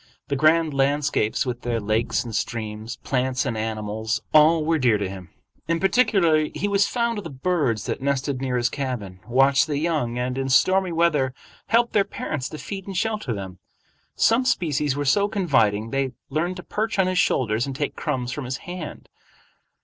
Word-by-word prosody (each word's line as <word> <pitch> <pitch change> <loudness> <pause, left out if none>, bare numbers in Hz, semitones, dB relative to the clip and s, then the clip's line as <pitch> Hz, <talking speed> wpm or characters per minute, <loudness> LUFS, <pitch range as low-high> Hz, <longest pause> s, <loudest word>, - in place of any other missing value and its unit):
The 140 - 0
grand 155 +2 +3
landscapes 140 -5 +1
with 125 -1 -4
their 120 -1 -1
lakes 110 +1 0
and 115 -3 -6
streams, 110 +1 -4
plants 130 0 0
and 125 -4 -2
animals, 110 0 -2
all 155 +1 +5
were 160 0 +2
dear 120 -5 +3
to 100 -1 -2
him. 95 -2 -9 0.4
In 165 0 +1
particular 190 -7 +3
he 205 - -1
was 200 0 +3
fond 235 -2 -1
of - - -8
the 165 - -6
birds 135 - -1
that - - -3
nested 140 -1 -1
near 130 -2 -1
his 120 0 +2
cabin, 125 -10 -4
watched 135 +5 +4
the 145 -2 -1
young, 150 -7 -1
and 125 +1 -2
in 135 0 -2
stormy 185 +7 +3
weather 155 -6 +1 0.3
helped 235 +3 +2
their 205 - +4
parents 150 -7 -4
to 155 - -7
feed 195 +4 -7
and 195 -2 -4
shelter 215 - -1
them. 95 -4 -6 0.6
Some 230 +3 +3
species 150 - 0
were 145 0 -2
so 200 +9 +3
confiding 115 - +1
they 135 -1 -1 0.2
learned 170 +5 -1
to 180 - -8
perch 220 +1 -2
on 190 - +4
his 185 -1 +1
shoulders 115 -1 +1
and 135 - -5
take 145 +1 -2
crumbs 130 -5 -2
from 145 +1 -5
his 125 +1 -3
hand. 175 -4 -7
140 Hz, 190 wpm, -23 LUFS, 120-170 Hz, 0.6 s, all